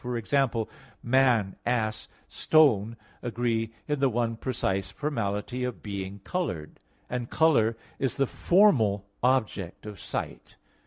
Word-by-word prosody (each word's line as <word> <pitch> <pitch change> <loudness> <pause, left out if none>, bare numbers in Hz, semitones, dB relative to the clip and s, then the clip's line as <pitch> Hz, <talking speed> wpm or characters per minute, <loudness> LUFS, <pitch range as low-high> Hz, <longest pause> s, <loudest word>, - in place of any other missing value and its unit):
For 125 -1 -2
example, 115 -1 +1 0.4
man, 120 -6 +3
ass, 110 -3 -1 0.2
stone 115 -8 +3 0.2
agree 115 -2 -1 0.2
in 150 -2 -1
the 135 -1 +3
one 115 -1 0
precise 95 -6 -2
formality 120 -2 -2
of 125 -1 -4
being 100 -1 -5
colored; 90 - -3 0.3
and 120 -1 -4
color 115 -9 +3 0.2
is 135 -4 -1
the 135 - +3
formal 125 - +3 0.2
object 110 -9 0
of 105 -3 -8
sight. - - -5
115 Hz, 120 wpm, -27 LUFS, 105-130 Hz, 0.4 s, man